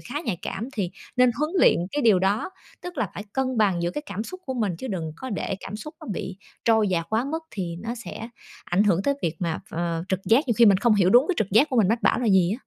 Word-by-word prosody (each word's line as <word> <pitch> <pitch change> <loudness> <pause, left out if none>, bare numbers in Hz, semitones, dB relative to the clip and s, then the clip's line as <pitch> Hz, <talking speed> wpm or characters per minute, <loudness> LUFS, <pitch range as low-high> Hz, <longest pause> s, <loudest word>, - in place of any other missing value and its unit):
khá 285 +5 -5
nhạy 200 -8 -2
cảm 225 +5 -4
thì 200 -8 -2 0.3
nên 250 0 +5
huấn 305 +1 0
luyện - - +6 0.2
cái 290 - -1
điều 220 -6 +5
đó, 195 - 0 0.3
tức 355 0 -7
là 215 - 0
phải 205 - -6
cân 260 -1 -1
bằng 195 -5 +2
giữa 170 - 0
cái 295 - -5
cảm 205 +1 -4
xúc 370 +8 -8
của 260 - -3
mình, 210 -8 -1
chứ - - -6
đừng 165 -7 -3
có 260 +8 -7
để 195 -2 -2
cảm 200 +2 -6
xúc 300 +9 -9
nó 310 - -10
bị 190 0 -5 0.3
trôi 220 -2 +4
dạt 170 -3 -1
quá 220 +3 +1
mức 320 +4 -3
thì 175 -4 -4
nó 230 +2 -3
sẽ 235 -1 -8 0.4
ảnh 185 +4 +2
hưởng 190 -3 +2
tới 280 - +1
việc 165 -1 -1
mà 170 -3 -1
ph - - -10
ờ, 170 0 -2
trực 190 -1 -1
giác, 250 +7 +3
nhiều 235 - +2
khi 235 - +8
mình 195 -3 +6
không 235 -1 +3
hiểu 190 -3 +3
đúng 245 +5 +7
cái 370 - +2
trực 200 - 0
giác 225 +10 +5
của 255 - 0
mình 215 -5 +4
mách 225 +2 0
bảo - - +3
là 245 - -1
gì 190 -4 +4
á. - - -18
215 Hz, 290 wpm, -25 LUFS, 185-250 Hz, 0.4 s, khi